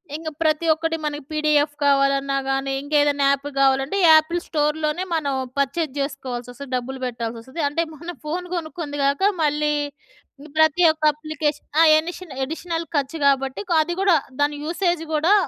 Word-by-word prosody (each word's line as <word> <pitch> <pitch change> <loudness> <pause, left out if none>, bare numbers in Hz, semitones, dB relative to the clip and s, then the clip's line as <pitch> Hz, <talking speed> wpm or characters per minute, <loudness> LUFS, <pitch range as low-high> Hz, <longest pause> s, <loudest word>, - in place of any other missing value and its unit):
ఇంగ 320 +1 -7 0.2
ప్రతి 310 +1 +1
ఒక్కటి 325 +1 -2
మన 295 -1 -1 0.2
పిడిఎఫ్ 300 -1 +2
కావాలన్నా 275 0 +2
గానీ, 270 0 -1
ఇంకా 290 +1 -3
ఏదైనా 285 -1 +2
యాప్ 280 +1 -1
కావాలంటే, 270 +6 +2
యాపిల్ 315 +2 +4
స్టోర్‍లోనే 305 +3 0
మనం 285 -4 -1 0.3
పర్చేజ్ 280 +1 -1
చేసుకోవాల్సి 260 -4 -5
వస్తది. 270 +2 -10
డబ్బులు 260 +1 -4
పెట్టాల్సి 235 -1 -4
వస్తది. 260 +8 -6
అంటే 330 +4 0
మనం 335 +3 -8
ఫోన్ 355 +4 -3
కొనుక్కుంది 315 -3 -5
కాక, 280 +3 +1 0.2
మళ్ళీ 300 0 +1 0.9
ప్రతి 315 +3 +4
ఒక్క 315 0 -10
అప్లికేషన్ 300 -1 -3
ఆ! - - +8 0.2
ఎనిషన్ 345 +1 -7
అడిషనల్ 330 +3 -4
ఖర్చు 285 +2 -1
కాబట్టి. 270 -1 +1 0.2
అది 345 +3 -2
కూడా 390 -3 +5 0.3
దాని 290 +1 +2
యూసేజ్ 345 0 0
గూడా 315 +6 +3
300 Hz, 150 wpm, -22 LUFS, 275-325 Hz, 0.9 s, ఆ